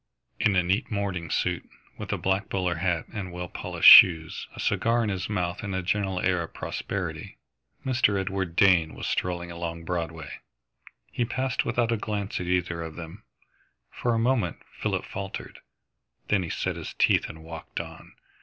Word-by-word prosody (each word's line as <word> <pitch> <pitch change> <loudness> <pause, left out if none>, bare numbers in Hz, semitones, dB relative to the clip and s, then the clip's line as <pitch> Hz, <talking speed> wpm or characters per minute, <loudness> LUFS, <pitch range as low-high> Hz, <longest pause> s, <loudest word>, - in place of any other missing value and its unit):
In 100 - +3
a 90 - +4
neat 95 +8 0
morning 95 -6 -2
suit, - - -1 0.3
with - - -5
a - - 0
black 95 +3 0
bowler 90 -3 -1
hat 85 -2 0
and 100 -5 -5
well 90 0 -5
polished - - +5
shoes, 80 -2 +8
a - - -10
cigar 115 +1 +1
in 110 - -1
his 95 0 -3
mouth 90 -4 -2
and 100 -3 -4
a 95 - -2
general 95 0 0
air 90 -1 +1
of 85 - -8
prosperity, - - -4 0.5
Mr. 120 -6 +2
Edward 95 -3 -3
Dane 90 -5 +4
was - - -6
strolling 85 -1 -2
along 85 -1 -5
Broadway. 80 -4 -4 0.7
He 120 - 0
passed 130 +1 -1
without 120 -1 +1
a 115 - +1
glance 105 -1 -3
at 90 - -4
either 90 -2 0
of 80 -1 -6
them. 85 +5 -9 0.7
For 120 -1 -1
a - - +1
moment 115 -7 +1 0.2
Philip - - -1
faltered. 95 -1 -7 0.7
Then 105 -3 +3
he 85 - -4
set - - -2
his - - -7
teeth - - +3
and 80 0 -10
walked 80 0 -7
on. - - -9
90 Hz, 175 wpm, -27 LUFS, 85-105 Hz, 0.7 s, shoes